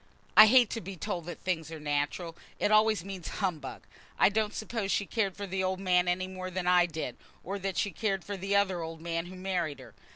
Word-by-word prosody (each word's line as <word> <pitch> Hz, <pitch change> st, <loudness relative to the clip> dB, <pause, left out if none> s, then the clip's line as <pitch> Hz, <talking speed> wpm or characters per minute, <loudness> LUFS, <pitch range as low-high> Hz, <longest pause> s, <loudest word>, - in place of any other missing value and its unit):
"I 215 Hz, -, +11 dB
hate 245 Hz, -1 st, +6 dB
to 230 Hz, -, -3 dB
be 190 Hz, +2 st, -7 dB
told 175 Hz, -2 st, -4 dB
that 175 Hz, -, -7 dB
things 165 Hz, -4 st, -2 dB
are 160 Hz, -, -6 dB
natural. 150 Hz, +3 st, -2 dB, 0.2 s
It 205 Hz, -, +1 dB
always 215 Hz, -4 st, +4 dB
means 190 Hz, -4 st, -6 dB
humbug. 165 Hz, -9 st, -3 dB, 0.3 s
I -, -, +6 dB
don't 215 Hz, 0 st, -1 dB
suppose 220 Hz, -3 st, -3 dB
she 200 Hz, -, +1 dB
cared 200 Hz, -4 st, -1 dB
for 200 Hz, -, -4 dB
the 190 Hz, 0 st, -2 dB
old 185 Hz, 0 st, -1 dB
man 180 Hz, -2 st, +2 dB
any 180 Hz, +1 st, +1 dB
more 185 Hz, 0 st, -6 dB
than 185 Hz, 0 st, -3 dB
I 180 Hz, -1 st, +5 dB
did, 155 Hz, -6 st, -5 dB, 0.3 s
or 200 Hz, +2 st, -4 dB
than 195 Hz, -1 st, -3 dB
she 200 Hz, -, 0 dB
cared 195 Hz, -4 st, -1 dB
for 205 Hz, -, -5 dB
the 195 Hz, +1 st, -1 dB
other 190 Hz, -3 st, +2 dB
old 165 Hz, 0 st, -6 dB
man 165 Hz, +1 st, -3 dB
who 185 Hz, -, -9 dB
married 180 Hz, -5 st, -2 dB
her. -, -, -13 dB
185 Hz, 230 wpm, -30 LUFS, 170-200 Hz, 0.3 s, I